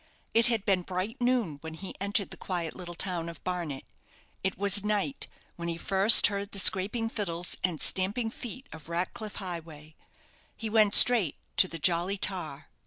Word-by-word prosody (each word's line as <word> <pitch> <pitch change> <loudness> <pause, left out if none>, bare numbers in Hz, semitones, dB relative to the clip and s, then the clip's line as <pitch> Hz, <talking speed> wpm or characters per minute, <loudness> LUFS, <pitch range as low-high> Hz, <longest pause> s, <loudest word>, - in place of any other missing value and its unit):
It 230 +2 +4
had 230 -4 -1
been 190 -2 +1
bright 190 +8 -5
noon 240 - -1
when 160 0 -8
he 190 +4 -8
entered 200 0 -1
the - - -7
quiet 175 -4 -5
little 175 -2 -8
town 170 -2 -3
of 165 - -12
Barnet. 170 -7 -4 0.6
It 190 0 -2
was 200 0 +3
night 210 +6 -2 0.3
when 170 0 -6
he 165 -1 -4
first 195 +5 +7
heard 200 0 -2
the - - -3
scraping 200 +4 +3
fiddles 180 -6 -4
and 175 -4 -2
stamping 205 +5 +2
feet 255 +3 -9
of 160 0 -12
Ratcliff 185 +5 -4
Highway. 160 -5 -8 0.6
He 220 -2 -6
went 215 -2 +5
straight 225 - +6 0.2
to 185 - +5
the 165 - -8
'Jolly 175 +4 0
Tar'. 160 -7 -5
190 Hz, 175 wpm, -28 LUFS, 170-210 Hz, 0.6 s, first